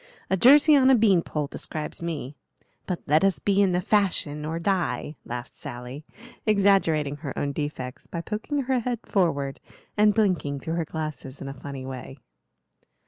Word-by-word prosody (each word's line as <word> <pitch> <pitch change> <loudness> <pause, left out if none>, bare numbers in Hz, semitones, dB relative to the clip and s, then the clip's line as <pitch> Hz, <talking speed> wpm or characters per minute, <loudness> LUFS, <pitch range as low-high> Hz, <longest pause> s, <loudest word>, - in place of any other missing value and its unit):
'A 190 - +3
jersey 290 - +7
on 265 -2 +5
a 265 - +7
bean 205 -6 +4
pole' 150 -2 -3
describes 155 +2 -6
me; 150 -5 -4 0.5
but 180 -2 -3
let 155 +5 +3
us 195 -2 +3
be 200 0 +2
in 195 -2 +3
the 180 - +1
fashion 180 -7 +1
or 160 +2 -2
die," 175 -3 -1
laughed 120 0 -6
Sally, 125 +4 -8 0.4
exaggerating 190 -9 +3
her 145 -3 -6
own 145 - -1
defects 140 -3 -5
by 170 - -5
poking 220 - -3
her 260 0 +1
head 240 0 -2
forward 145 -9 0 0.4
and 210 0 +4
blinking 180 -10 +1
through 160 +4 -4
her 165 -1 -1
glasses 155 -4 -6
in 135 - -6
a 135 - -5
funny 140 -1 -7
way. 130 +1 -7
165 Hz, 170 wpm, -25 LUFS, 140-200 Hz, 0.5 s, jersey